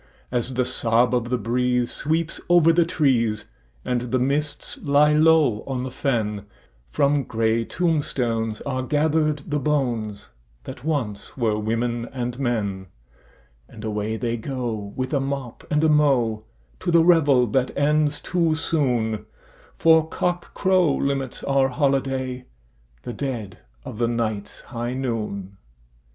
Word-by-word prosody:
As 125 +1 -2
the 125 0 +1
sob 120 +1 +2
of 120 -1 0
the 125 - +1
breeze 125 +2 0
sweeps 160 +2 -2
over 170 -2 +6
the 170 0 +4
trees, 115 -10 +1 0.4
and 125 -1 -1
the 130 - +1
mists 145 +3 -2
lie 145 +1 +4
low 155 -7 +4
on 130 -2 -2
the 130 - -5
fen, 105 -6 -2 0.4
From 140 - +2
grey 115 -1 0
tombstones 120 -10 -1
are 130 -2 -2
gathered 150 +1 +1
the 150 0 -1
bones 120 -8 -2 0.3
that 120 - -9
once 130 -11 -3
were 110 -4 +1
women 115 +2 -2
and 125 -1 -4
men, 100 -7 -2 0.8
And 110 - -11
away 110 0 -2
they 120 0 -2
go, 115 -5 -4
with 130 +1 -3
a 140 - +3
mop 135 -3 -4
and 150 +1 +2
a - - +5
mow, 130 -8 +2 0.3
to 185 - -3
the 170 -1 +5
revel 145 -8 +5
that 125 +3 +1
ends 150 +1 +2
too 170 -3 +1
soon, 125 -9 0 0.5
For 160 -1 +4
cockcrow 180 -2 +1
limits 135 -2 -2
our 135 -1 +2
holiday—the 125 - -3
dead 120 -8 -5 0.3
of 110 - -7
the 120 - +2
night's 110 -3 -3
high 120 0 -4
noon! 105 -7 -4
125 Hz, 135 wpm, -23 LUFS, 115-145 Hz, 0.8 s, over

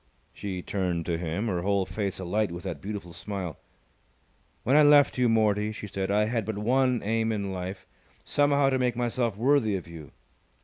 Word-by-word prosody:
She 95 -3 -5
turned 90 -4 -2
to 85 -2 -1
him, 85 +5 -2
her 90 -6 -1
whole 100 0 +1
face 100 -2 -3
alight 95 +2 -1
with 85 0 -7
that 85 -7 -5
beautiful 100 -3 -6
smile. 95 -6 -5 1.0
"When 135 - +2
I 150 - +8
left 145 -3 +5
you, 125 -1 +4
Mortie," 105 -1 +2
she 110 - -7
said, 95 -1 -3
"I 105 +1 +3
had 115 0 -1
but 110 0 -4
one 125 +3 +2
aim 110 +2 0
in 100 -3 -2
life, 95 +1 -6 0.4
somehow 145 -1 +2
to 130 - +1
make 125 -2 +1
myself 120 -3 -1
worthy 120 -3 +3
of 90 - -5
you. 80 -4 -10
105 Hz, 185 wpm, -27 LUFS, 95-120 Hz, 1.0 s, I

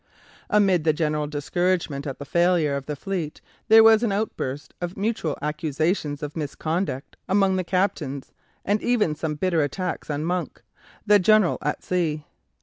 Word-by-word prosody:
Amid 195 -5 +3
the 155 -1 +3
general 150 -1 -1
discouragement 150 0 -1
at 135 - -5
the 140 - -8
failure 170 -2 +2
of 140 -1 -5
the 150 - -3
fleet 170 -1 -4 0.3
there 225 0 +8
was 225 0 +7
an 235 -4 +1
outburst 155 -9 -3
of 175 +1 -4
mutual 200 -7 -1
accusations 150 0 -1
of 150 0 -5
misconduct 155 -1 -3
among 195 0 +3
the 185 - 0
captains, 170 -7 -2 0.3
and 205 +2 +1
even 225 -10 +1
some 155 0 -3
bitter 170 +1 +1
attacks 155 +6 -3
on 150 +1 -2
Monk, 180 +1 -3 0.4
the 210 -1 +6
"General 215 -1 +4
at - - -2
Sea." 155 -5 -1
170 Hz, 155 wpm, -24 LUFS, 150-190 Hz, 0.4 s, there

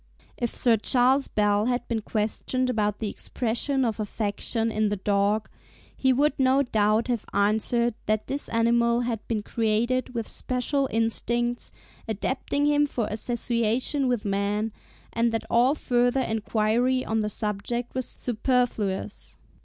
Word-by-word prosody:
If 240 -1 -3
Sir 230 -3 +3
C. 255 - 0 0.4
Bell 210 +1 +2
had 245 0 -1
been 225 -2 -1
questioned 230 +4 -1
about 210 -3 0
the 220 - -3
expression 255 +3 -1
of 225 -2 -2
affection 215 +2 -1
in 215 -1 +1
the 205 - 0
dog, 205 +2 +1 0.5
he 265 - +2
would 285 +3 +3
no 265 +1 +4
doubt 215 -2 +2
have 240 -4 -1
answered 220 +4 +2
that 215 0 +1
this 280 +2 -3
animal 235 +1 +2
had 235 -2 -2
been 215 -3 -1
created 235 +4 0
with 230 -2 -2
special 265 +2 -1
instincts, 235 +2 -1 0.4
adapting 260 +6 -1
him 295 0 +3
for 240 -5 -2
association 240 +4 0
with 245 -4 0
man, 205 +2 0 0.4
and 230 +1 +2
that 225 - -1
all 250 +5 +4
further 245 -1 +1
enquiry 225 +3 +1
on 220 0 0
the 210 -1 0
subject 215 +4 -3
was 255 -1 -2
superfluous. 225 -5 -1
230 Hz, 140 wpm, -26 LUFS, 215-250 Hz, 0.5 s, no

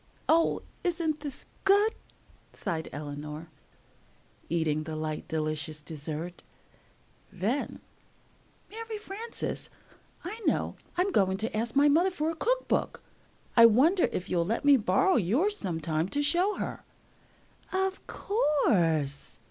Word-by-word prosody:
"Oh, 330 +1 +3 0.2
isn't 330 -3 0
this 290 -3 -7 0.2
good," 405 +3 +4 0.6
sighed 160 -2 -3
Eleanor, 150 +2 -6 1.0
eating 160 -2 +1
the 155 0 -5
light, 155 0 -4
delicious 155 -1 -2
dessert. 155 +3 -6 0.9
Then, 210 +9 -2 0.9
"Mary 450 0 -5
Frances, 430 +2 -5 0.5
I 410 +6 -5
know; - - +1 0.2
I'm 370 +3 +2
going 190 - +2
to 220 +2 -3
ask 225 +3 -2
my 285 +1 +6
mother 330 +6 +4
for 320 -3 -1
a - - -6
cook - - 0
book! - - -1 0.5
I 230 -1 +10
wonder 310 - +4
if 180 - -3
you'll 175 -3 +1
let 225 +10 -2
me 285 -1 +8
borrow 250 - +3
yours 265 - +2
some 175 -5 -2
time 160 +2 -1
to 290 +7 0
show 355 +7 +2
her." - - -5 0.9
"Of 380 0 -1
course!" 175 - +1
230 Hz, 125 wpm, -29 LUFS, -, 1.0 s, I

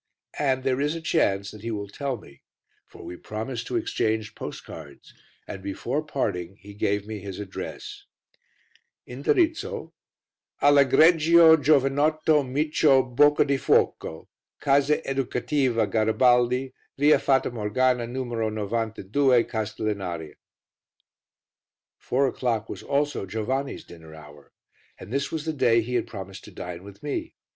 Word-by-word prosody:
And 130 -3 +1
there 130 0 0
is 150 +3 0
a - - -4
chance 100 -12 0
that 105 - -12
he 115 - -5
will 105 -2 -4
tell 135 +5 -4
me, 70 -9 -17 0.5
for - - -14
we 90 - -7
promised 110 +5 -6
to - - -4
exchange 110 - -1
postcards, 70 -4 -10 0.3
and 95 - -7
before 120 +9 -3
parting 95 - -3
he 100 +3 -12
gave 100 0 -1
me 110 -1 -6
his 100 -1 -8
address 405 - -7 1.0
(Indirizzo) 435 +4 -1 0.7
ALL' 145 0 +5
EGREGIO 160 +3 +6
GIOVANOTTO 150 +2 +3
MICIO 135 -2 +2
BOCCADIFUOCO, 140 - +2 0.3
Casa 140 +1 +2
Educativa 130 -2 0
Garibaldi, 120 +4 +2 0.2
Via 145 +2 +5
Fata 135 -2 +1
Morgana 120 +2 0
No. 130 +2 -4 0.3
92, 115 +4 +1
Castellinaria. 100 -7 -4 1.7
Four 135 +2 +1
o'clock 120 -4 -1
was - - -7
also 145 -7 -1
Giovanni's 130 +7 -3
dinner 80 -2 -13
hour, 75 -2 -15 0.5
and 110 - -10
this 140 0 -1
was 160 -1 -4
the 160 - -2
day 115 -5 +3
he 120 +3 -6
had 125 - 0
promised 95 -1 -9
to - - -12
dine 90 -1 -7
with 100 0 -13
me. 145 - -4
125 Hz, 125 wpm, -25 LUFS, 105-145 Hz, 1.7 s, EGREGIO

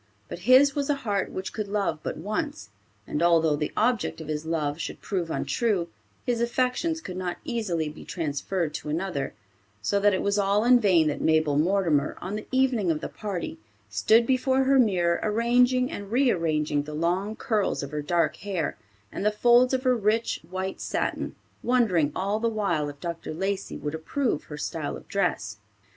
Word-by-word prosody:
But - - -6
his 275 +2 +7
was 285 0 -2
a 290 - +3
heart 200 -3 0
which 190 - -5
could 215 -2 -3
love 200 -6 -1
but - - -4
once, 160 - -4 0.4
and 150 - -3
although 165 -3 +4
the 150 0 -2
object 230 -4 +1
of 160 -1 -8
his 155 +1 -3
love 155 -2 -1
should - - -5
prove 180 -5 -3
untrue, 195 -1 0 0.4
his 240 -2 0
affections 255 +7 0
could 185 - -7
not 180 -1 -3
easily 210 - -1
be 150 +1 -9
transferred 160 +1 -2
to 150 - -5
another; 155 - -2 0.4
so 200 - +1
that 205 +1 +4
it - - -2
was 200 +1 +1
all 200 +1 +2
in 245 +1 +6
vain 185 -7 +4
that 145 - -3
Mabel 155 -2 +3
Mortimer, 160 -2 +2
on 190 +3 -4
the 215 - -6
evening 260 -7 +2
of 155 -2 +1
the - - -5
party, 195 -6 -5 0.3
stood 220 - +4
before 260 +1 +2
her 270 0 +4
mirror 180 -7 +3
arranging 245 +3 +2
and 200 0 -7
rearranging 165 - +2
the 150 +1 -7
long 180 +7 0
curls 210 -10 0
of 140 - -6
her 150 0 -2
dark 170 +3 +1
hair 195 -4 -3 0.3
and - - -4
the 210 - +4
folds 240 +4 +4
of 260 -1 0
her 255 -1 +3
rich 225 +1 +1
white 190 +1 -4
satin, - - -2 0.3
wondering 210 - +2
all 200 +3 0
the 230 +1 +1
while 195 -9 0
if 145 -1 -11
Dr. 170 -1 -5
Lacey 195 +3 -2
would 150 0 -4
approve 160 - -1
her 150 - -8
style 150 0 -3
of - - -15
dress. 135 - -1
195 Hz, 185 wpm, -26 LUFS, 160-230 Hz, 0.4 s, his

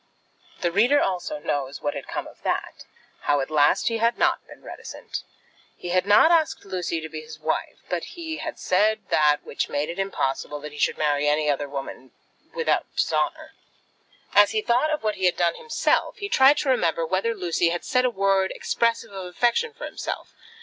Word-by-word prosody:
The 175 - +1
reader 240 +10 +4
also 190 - -1
knows 140 - -3
what 145 - 0
had - - -7
come - - -4
of - - -14
that, - - -3 0.4
how 145 - +3
at 135 +3 -3
last 145 -1 +3
he 230 -1 0
had 230 +1 +2
not - - +2
been - - -14
reticent. - - -7 0.6
He 175 - -7
had 185 +2 +1
not 210 +11 +6
asked 320 -9 +2
Lucy 180 -4 -3
to 160 - -5
be 155 0 -7
his 155 0 -11
wife; - - -2
but - - -2
he 320 -2 -4
had 315 - -5
said 215 +2 +1
that 150 -1 +3
which - - -3
made 145 +1 -1
it 170 +3 -5
impossible 150 -6 -2
that 150 0 -7
he 150 - -10
should - - +1
marry 150 -1 +1
any 150 0 +2
other 145 0 -3
woman 135 -2 -7 0.4
without 480 -1 0
dishonour. - - -1 0.8
As 205 0 +6
he 215 -1 0
thought 250 +6 +2
of 305 -4 -2
what 215 -1 -1
he 190 - 0
had 180 - 0
done 170 -1 +2
himself, 465 - 0
he 405 - -5
tried 270 -1 +6
to 285 - -1
remember 170 -9 +2
whether 190 +7 0
Lucy 175 -3 +1
had 175 0 -3
said 255 -1 +2
a 250 - +3
word 195 -3 +2
expressive 230 -1 0
of 190 -2 -6
affection 240 - +1
for 470 +2 -8
himself. - - -6
190 Hz, 200 wpm, -24 LUFS, 155-235 Hz, 0.8 s, not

